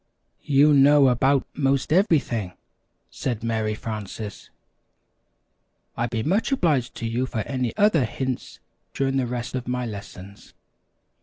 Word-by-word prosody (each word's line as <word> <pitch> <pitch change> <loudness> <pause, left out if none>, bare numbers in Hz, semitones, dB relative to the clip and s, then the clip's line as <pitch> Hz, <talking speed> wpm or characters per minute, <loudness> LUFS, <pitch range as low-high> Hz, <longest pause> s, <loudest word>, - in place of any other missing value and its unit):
"You 145 +1 +5
know 140 0 +6
about 135 +3 +2
'most 135 +1 0
everything!" 140 - +1 0.6
said 120 -4 -4
Mary 110 -2 -1
Frances. 105 -1 -7 1.5
"I'd 120 +1 -1
be 110 -1 -2
much 195 - 0
obliged 155 - +1
to 115 - -5
you 120 +3 -1
for 115 -4 -3
any 125 +1 -2
other 200 -10 +4
hints 130 +2 -5 0.4
during 135 0 0
the 130 -2 0
rest 120 0 -4
of 125 -2 -4
my 125 0 -2
lessons." 100 -2 -10
125 Hz, 130 wpm, -24 LUFS, 115-140 Hz, 1.5 s, know